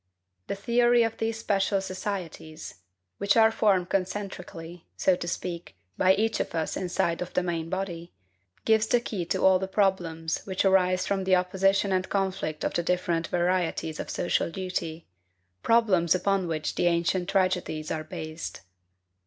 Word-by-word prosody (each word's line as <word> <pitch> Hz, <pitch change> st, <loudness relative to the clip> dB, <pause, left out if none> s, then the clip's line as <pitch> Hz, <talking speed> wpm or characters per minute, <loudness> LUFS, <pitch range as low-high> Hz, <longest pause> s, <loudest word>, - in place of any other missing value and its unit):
The -, -, -2 dB
theory 240 Hz, +3 st, +3 dB
of 225 Hz, -1 st, -2 dB
these 225 Hz, 0 st, -2 dB
special 200 Hz, -2 st, +1 dB
societies 185 Hz, -, -6 dB, 0.4 s
which 200 Hz, +3 st, +2 dB
are 220 Hz, 0 st, +6 dB
formed 190 Hz, -5 st, +2 dB
concentrically, 180 Hz, -3 st, -4 dB
so 190 Hz, -, +3 dB
to 170 Hz, -, -6 dB
speak, 175 Hz, 0 st, -5 dB, 0.2 s
by 185 Hz, -, +4 dB
each 220 Hz, +2 st, 0 dB
of -, -, -3 dB
us 160 Hz, -1 st, -1 dB
inside 175 Hz, -2 st, -1 dB
of 180 Hz, -, -6 dB
the 180 Hz, -, +2 dB
main 165 Hz, -2 st, -2 dB
body 180 Hz, -2 st, -4 dB, 0.5 s
gives 220 Hz, -1 st, +3 dB
the 245 Hz, -, +3 dB
key 205 Hz, -6 st, -4 dB
to -, -, 0 dB
all 190 Hz, -1 st, +6 dB
the 190 Hz, -, -3 dB
problems 175 Hz, -5 st, 0 dB
which 190 Hz, 0 st, -1 dB
arise 185 Hz, -1 st, +3 dB
from 195 Hz, -1 st, -1 dB
the 185 Hz, 0 st, +4 dB
opposition 195 Hz, +2 st, +2 dB
and 185 Hz, 0 st, 0 dB
conflict 190 Hz, -6 st, -2 dB
of -, -, -1 dB
the -, -, +1 dB
different 170 Hz, -1 st, 0 dB
varieties 175 Hz, -3 st, 0 dB
of -, -, -5 dB
social 175 Hz, -, 0 dB
duty, 170 Hz, -3 st, -4 dB, 0.6 s
problems 195 Hz, -8 st, +3 dB
upon 190 Hz, 0 st, +1 dB
which 155 Hz, -2 st, -2 dB
the 175 Hz, -, +1 dB
ancient 175 Hz, +2 st, +1 dB
tragedies 185 Hz, -5 st, 0 dB
are 155 Hz, -, -2 dB
based. 155 Hz, +1 st, -7 dB
185 Hz, 160 wpm, -27 LUFS, 170-195 Hz, 0.6 s, are